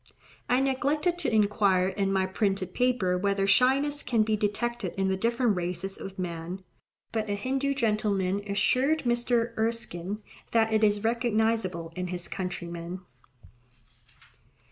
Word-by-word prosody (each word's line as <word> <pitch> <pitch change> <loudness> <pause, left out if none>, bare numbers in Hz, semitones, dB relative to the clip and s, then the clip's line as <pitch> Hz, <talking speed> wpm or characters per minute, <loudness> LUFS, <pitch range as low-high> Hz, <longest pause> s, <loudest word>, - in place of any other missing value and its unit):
I 250 - +4
neglected 295 +6 +1
to - - 0
inquire 200 -3 +3
in 195 0 -1
my 190 -1 +2
printed 190 -1 -1
paper 240 -8 +1
whether 200 0 +1
shyness 270 +8 +3
can 235 -3 +2
be 215 0 +1
detected 215 0 -2
in 195 0 +1
the 190 - +1
different 235 +2 +1
races 180 +2 -3
of 195 0 -8
man; 175 +1 -5 0.5
but 220 -2 -2
a 205 - 0
Hindoo 270 +6 -1
gentleman 205 -5 +1
assured 260 +9 +2
Mr. 240 -1 +1
Erskine 210 -3 -2 0.3
that 225 -1 +3
it 220 0 +3
is 205 -1 +3
recognizable 220 -7 0
in 180 0 -3
his 175 -1 -4
countrymen. 180 -1 -5
210 Hz, 135 wpm, -28 LUFS, 190-240 Hz, 0.5 s, I